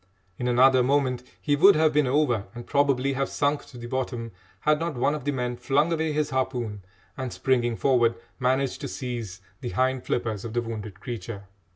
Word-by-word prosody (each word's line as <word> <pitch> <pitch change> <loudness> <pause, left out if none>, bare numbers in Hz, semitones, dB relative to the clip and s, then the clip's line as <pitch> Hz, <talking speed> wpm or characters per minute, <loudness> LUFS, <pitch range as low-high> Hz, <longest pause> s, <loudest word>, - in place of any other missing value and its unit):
In 125 - -1
another 130 +1 +5
moment 130 -1 +1 0.2
he 145 - +1
would 190 +6 +7
have 155 0 +3
been 150 -2 +3
over 125 -6 +1
and 120 0 -7
probably 140 -1 +2
have 135 +1 -1
sunk 145 0 0
to 125 - -13
the 120 - -8
bottom, 120 -2 -3 0.3
had 150 0 +3
not 165 -2 -2
one 125 +4 +1
of 150 -3 -5
the 145 - +1
men 125 -2 -2
flung 145 +7 +2
away 160 -1 0
his 150 0 -1
harpoon, 125 -6 -2 0.3
and, 130 -4 -4
springing 120 -2 +1
forward, 120 -2 +3 0.2
managed 130 +1 0
to - - -3
seize 115 -8 -5 0.2
the 120 - -4
hind 130 0 0
flippers 110 -5 -2
of 115 - -6
the 120 - +1
wounded 105 -4 -6
creature. 115 -3 -6
130 Hz, 195 wpm, -26 LUFS, 120-145 Hz, 0.3 s, would